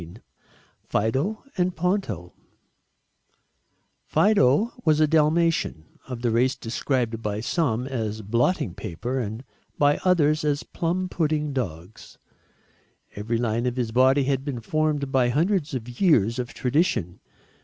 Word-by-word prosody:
XVI 85 +4 -11 0.7
FIDO 135 - -1 0.2
AND 180 0 +1
PONTO 160 - -2 1.7
Fido 205 - +3
was 155 -2 +3
a 155 - +5
Dalmatian 155 - +1
of 125 -2 -6
the 120 - +2
race 125 +4 +2
described 120 -1 -2
by 105 -1 -2
some 125 -1 0
as 110 -5 -3
blotting 115 - 0
paper 120 +13 -4
and 110 +1 -4 0.3
by 145 0 +3
others 155 -5 +3
as 145 -1 0
plum 180 +2 -2
pudding 155 -4 -1
dogs. 90 -6 -6 1.0
Every 110 +3 -2
line 115 +1 0
of 125 - -2
his 120 -3 -2
body 130 +3 +4
had 135 0 0
been 135 -5 -4
formed 150 +1 -1
by 130 -2 +3
hundreds 160 +2 0
of 120 -2 -5
years 120 - +3
of 125 -1 -4
tradition. 125 - 0
130 Hz, 130 wpm, -24 LUFS, 115-155 Hz, 1.7 s, a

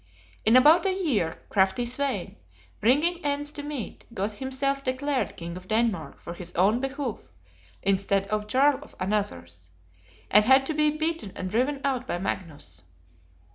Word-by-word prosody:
In 220 +3 +5
about 310 +9 +6
a - - +3
year, 255 - 0
crafty 195 +4 +2
Svein, 255 -5 -2 0.4
bringing 305 +10 +2
ends 290 0 -1
to 295 - -6
meet, 290 -5 -6
got 200 +1 -1
himself 270 +4 -2
declared 265 +1 -1
King 170 0 -6
of 185 0 -10
Denmark 220 -6 0
for 170 - -7
his 175 0 -9
own 200 +7 +3
behoof, 270 -3 -3 0.6
instead 195 0 +1
of 210 0 -1
Jarl 270 +4 +3
for - - -21
another's: 90 - -3 0.6
and 210 +1 +7
had 265 +2 +6
to 315 - -2
be 300 0 +3
beaten 310 - -2
and 185 0 -4
driven 265 +5 0
out 260 -2 -1
by - - -1
Magnus. 155 - -5
245 Hz, 155 wpm, -26 LUFS, 195-285 Hz, 0.6 s, and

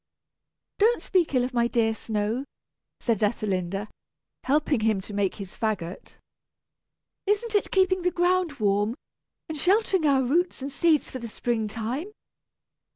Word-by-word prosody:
"Don't 455 +4 +4
speak 350 -7 +1
ill 250 - +4
of 250 +1 -3
my 235 -1 +3
dear 225 -2 +2
snow," 220 +3 -2 0.6
said 230 -4 0
Ethelinda, 200 -2 -1 0.6
helping 290 -1 +2
him 215 -2 +2
to 200 +2 -9
make 200 -2 0
his 195 -3 -9
fagot. 200 -5 -3 1.1
"Isn't 420 +3 +1
it 415 - +2
keeping 375 -1 +3
the 360 - +2
ground 355 -2 +1
warm, 205 -2 +1 0.5
and 315 - -5
sheltering 380 -3 +3
our 270 -2 +4
roots 340 +8 +1
and 275 +1 -5
seeds 310 +1 +2
for 260 - -5
the 235 - -6
spring 225 0 -1
time? 240 - -4
250 Hz, 145 wpm, -26 LUFS, 215-350 Hz, 1.1 s, Don't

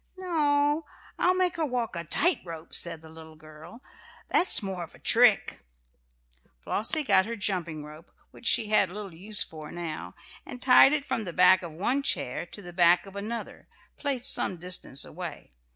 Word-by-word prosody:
"No, 300 -4 +1 0.3
I'll 365 +1 +3
make 365 -1 +2
her 325 - 0
walk 245 -6 -3
a 170 - -3
tight 340 - +2
rope," 165 -2 -10
said 165 -2 -1
the 160 - -13
little 160 0 -13
girl. 155 - -14 0.5
"That's 355 - +3
more 190 -3 -4
of 165 - -11
a - - -15
trick." - - +3 1.0
Flossie 265 +9 -1
got 195 -5 +3
her 235 - -4
jumping 170 -8 -3
rope, 155 +2 -13 0.2
which 235 - -7
she 215 - +3
had 205 -3 +3
little 200 -1 -8
use 205 +6 0
for 155 -2 -10
now, 155 - -6 0.3
and 250 - -9
tied 255 +1 +7
it 295 -2 0
from 220 - -2
the 175 - -6
back 185 +2 +5
of 170 -3 -8
one 240 - 0
chair - - -2
to 205 - -11
the 175 0 -10
back 175 +1 +4
of 195 0 -13
another, 220 +4 -6 0.3
placed 275 -3 0
some 185 - -1
distance 170 -6 -1
away. 175 - -8
190 Hz, 180 wpm, -27 LUFS, 165-250 Hz, 1.0 s, tied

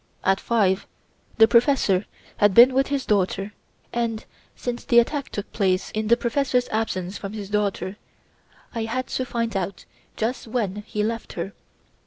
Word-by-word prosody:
At 195 +1 +3
five 200 -5 +1 0.5
the 225 - +8
professor 235 -6 +3 0.3
had 205 -2 +4
been 245 +2 +9
with 270 +1 +2
his 280 -1 -1
daughter, 200 0 0 0.4
and 230 -2 -2 0.3
since 245 -1 -4
the 235 - +2
attack 275 +4 +3
took 205 - -6
place 190 -3 +1
in 215 0 -2
the 235 +2 +5
professor's 250 0 +1
absence 200 -4 -2
from 195 0 -6
his 205 -2 -7
daughter, 200 -2 -1 0.8
I 230 -1 -2
had 255 +3 -2
to 255 - -2
find 230 -2 -2
out 195 0 -3 0.3
just 235 +2 -2
when 215 -4 -1
he 210 - -1
left 230 +1 -3
her. 190 +3 -4
220 Hz, 160 wpm, -24 LUFS, 195-240 Hz, 0.8 s, been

